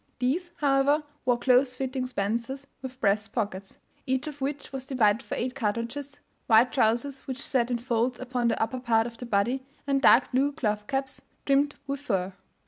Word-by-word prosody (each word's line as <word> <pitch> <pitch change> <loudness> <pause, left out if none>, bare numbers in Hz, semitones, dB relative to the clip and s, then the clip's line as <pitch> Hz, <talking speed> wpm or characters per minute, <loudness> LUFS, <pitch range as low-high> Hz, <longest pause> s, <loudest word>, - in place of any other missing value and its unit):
These, 290 +9 0
however, 285 0 +3 0.2
wore 245 -1 +3
close 255 +1 +3
fitting 260 0 -2
spencers 235 +5 -2 0.2
with 260 -1 -8
breast 210 -1 +1
pockets, 200 -4 -3 0.3
each 260 +1 0
of 295 -2 -7
which 280 +1 -4
was 265 -1 -4
divided 235 -5 +2
for - - -5
eight 250 +1 -2
cartridges, 250 +4 -3 0.3
wide 230 +3 +5
trousers, 260 +2 +1
which 260 -1 -4
sat 250 -3 0
in 245 - 0
folds 240 +1 -1
upon 250 -2 -1
the 230 - +1
upper 255 +3 -1
part 225 -2 +2
of 230 -1 -8
the 245 - -6
body, 235 +5 +1 0.2
and 275 -1 +1
dark 255 -1 +6
blue 275 +3 +2
cloth 210 -7 -2
caps, 270 -1 -2 0.2
trimmed 285 +1 +2
with 280 0 -3
fur. 195 -8 -1
255 Hz, 180 wpm, -27 LUFS, 230-275 Hz, 0.3 s, dark